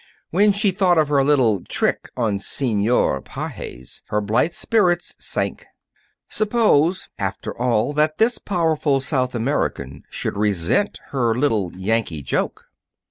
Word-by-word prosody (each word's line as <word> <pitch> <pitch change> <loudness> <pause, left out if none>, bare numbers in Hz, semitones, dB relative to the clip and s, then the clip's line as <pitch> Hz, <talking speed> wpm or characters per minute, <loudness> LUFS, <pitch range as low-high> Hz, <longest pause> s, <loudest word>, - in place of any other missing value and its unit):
When 205 +5 +4
she 200 0 +1
thought 180 -2 +2
of 155 -2 +3
her 140 -2 +3
little 125 -9 +3
trick - - -1
on 110 -5 0
Senor 110 - +1
Pages, 60 -1 -8
her 105 - 0
blithe 110 +11 +1
spirits 180 -6 +1
sank. - - -3 0.6
Suppose, 205 -6 +2
after - - -3
all, 120 +2 +1
that 155 +1 +1
this 230 +2 +2
powerful 160 -6 +1
South 130 -2 -1
American 110 - -2
should - - -4
resent 105 - +1
her 120 -5 +1
little 110 -9 +1
Yankee 95 -5 -1
joke! 65 - -2
135 Hz, 130 wpm, -21 LUFS, 105-170 Hz, 0.6 s, When